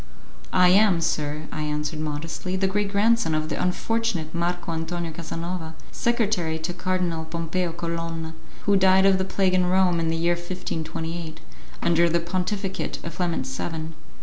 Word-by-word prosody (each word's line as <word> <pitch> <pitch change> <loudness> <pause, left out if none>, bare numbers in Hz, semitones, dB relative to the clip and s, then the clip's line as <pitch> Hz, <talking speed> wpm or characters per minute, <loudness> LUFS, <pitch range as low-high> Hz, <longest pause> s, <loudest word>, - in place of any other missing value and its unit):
"I 180 -1 +6
am, 195 -2 +5
sir," 150 -2 -1
I 155 - -3
answered 150 +1 -2
modestly, 155 +4 -3
"the 190 +1 +1
great 200 +1 0
grandson 205 -5 +3
of 155 0 -1
the - - -2
unfortunate 180 -3 0
Marco 175 0 -1
Antonio 165 +1 -3
Casanova, 165 0 -5 0.2
secretary 210 -9 +1
to 160 +3 -3
Cardinal 180 -2 -1
Pompeo 165 +2 -2
Colonna, 165 -1 -4 0.3
who 205 - +4
died 190 0 +5
of 195 -1 +5
the - - +2
plague 190 -1 +1
in 180 -1 +3
Rome, 180 -2 +3
in 165 - 0
the 165 0 0
year 170 +1 +3
1528, 165 -2 -4 0.4
under 170 0 +4
the 170 +1 +2
pontificate 185 +3 -2
of 170 -1 -6
Clement 175 -2 0
VII." 160 -1 -4
170 Hz, 155 wpm, -25 LUFS, 160-185 Hz, 0.4 s, I